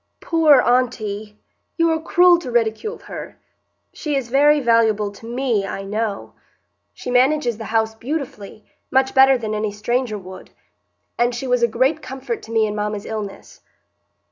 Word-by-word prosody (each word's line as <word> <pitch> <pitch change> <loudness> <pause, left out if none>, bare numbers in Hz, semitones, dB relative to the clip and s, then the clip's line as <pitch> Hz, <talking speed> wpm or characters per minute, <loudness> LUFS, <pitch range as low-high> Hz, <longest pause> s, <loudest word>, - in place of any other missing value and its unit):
"Poor 315 -5 +4
aunty! 215 -4 -1 0.4
You 335 -1 +3
are 320 0 -1
cruel 350 +1 +5
to 315 - -7
ridicule 240 - -1
her. - - -8 0.6
She 300 -3 -3
is 265 -4 -2
very 295 +3 +4
valuable 225 -4 +2
to 215 +3 -13
me, 240 -4 0
I 195 - -5
know. 210 +1 -3 0.6
She 250 - -7
manages 250 -2 +2
the 220 - -6
house 220 0 0
beautifully,—much 260 0 -4
better 265 0 +6
than 220 -3 -4
any 210 0 -2
stranger 225 +2 -2
would,—and 200 +5 -7
she 245 - -5
was 250 -1 +1
a 235 - +4
great 260 +7 +1
comfort 270 - -5
to 225 - -12
me 225 -1 +2
in 210 - -3
mamma's 210 -1 -3
illness." 215 -3 -7
240 Hz, 150 wpm, -20 LUFS, 215-270 Hz, 0.6 s, better